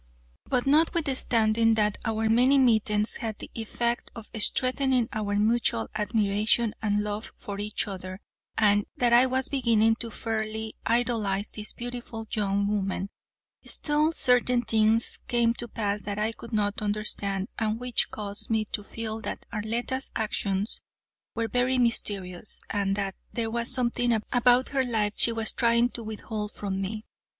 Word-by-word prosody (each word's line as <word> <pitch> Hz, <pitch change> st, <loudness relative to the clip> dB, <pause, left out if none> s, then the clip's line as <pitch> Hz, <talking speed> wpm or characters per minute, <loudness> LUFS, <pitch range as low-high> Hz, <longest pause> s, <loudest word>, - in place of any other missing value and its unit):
But 250 Hz, -2 st, +1 dB
notwithstanding 255 Hz, -8 st, +3 dB
that 210 Hz, -1 st, +1 dB
our 225 Hz, -1 st, 0 dB
many 250 Hz, +5 st, +4 dB
meetings 220 Hz, -4 st, +3 dB
had 220 Hz, -2 st, -4 dB
the -, -, -10 dB
effect 235 Hz, +1 st, -2 dB
of 225 Hz, -2 st, -10 dB
strengthening 255 Hz, +1 st, +4 dB
our 205 Hz, -2 st, -2 dB
mutual 210 Hz, -, +1 dB
admiration 215 Hz, +1 st, +1 dB
and 210 Hz, -1 st, +1 dB
love 210 Hz, +1 st, -4 dB
for 200 Hz, -4 st, -7 dB
each 210 Hz, +1 st, -2 dB
other, 185 Hz, -1 st, -7 dB, 0.4 s
and 205 Hz, -1 st, +3 dB
that 240 Hz, -1 st, +2 dB
I 245 Hz, +2 st, +7 dB
was 260 Hz, 0 st, +1 dB
beginning 225 Hz, -4 st, +2 dB
to 230 Hz, -, -5 dB
fairly 220 Hz, 0 st, -4 dB
idolize 225 Hz, -4 st, +1 dB
this 215 Hz, 0 st, -7 dB
beautiful 240 Hz, -2 st, -6 dB
young 200 Hz, -1 st, 0 dB
woman, 195 Hz, -1 st, -1 dB, 0.5 s
still 300 Hz, +1 st, +1 dB
certain 250 Hz, -4 st, +3 dB
things 220 Hz, 0 st, +2 dB
came 235 Hz, -1 st, +2 dB
to 240 Hz, 0 st, -5 dB
pass 210 Hz, -2 st, -2 dB
that 200 Hz, +1 st, -4 dB
I 215 Hz, +1 st, 0 dB
could 230 Hz, +1 st, -11 dB
not 205 Hz, -2 st, 0 dB
understand, 205 Hz, -2 st, -1 dB
and 220 Hz, 0 st, -1 dB
which 250 Hz, -1 st, +1 dB
caused 205 Hz, -1 st, -5 dB
me 220 Hz, -1 st, +1 dB
to 205 Hz, -, -2 dB
feel 220 Hz, +1 st, -5 dB
that -, -, -6 dB
Arletta's 235 Hz, +5 st, -2 dB
actions 205 Hz, -2 st, -1 dB, 0.5 s
were 230 Hz, 0 st, -1 dB
very 250 Hz, +3 st, +1 dB
mysterious, 205 Hz, -6 st, -1 dB
and 195 Hz, -1 st, 0 dB
that 195 Hz, -1 st, -2 dB, 0.2 s
there 225 Hz, -1 st, -2 dB
was 235 Hz, +1 st, +1 dB
something 245 Hz, -2 st, +1 dB
about 245 Hz, +1 st, +4 dB
her 270 Hz, -2 st, +1 dB
life 215 Hz, -4 st, 0 dB
she 235 Hz, -, +6 dB
was 225 Hz, -1 st, -1 dB
trying 235 Hz, 0 st, +3 dB
to 240 Hz, -, -7 dB
withhold 215 Hz, -1 st, -5 dB
from 195 Hz, -1 st, -3 dB
me. 215 Hz, +3 st, -4 dB
220 Hz, 150 wpm, -27 LUFS, 210-240 Hz, 0.5 s, I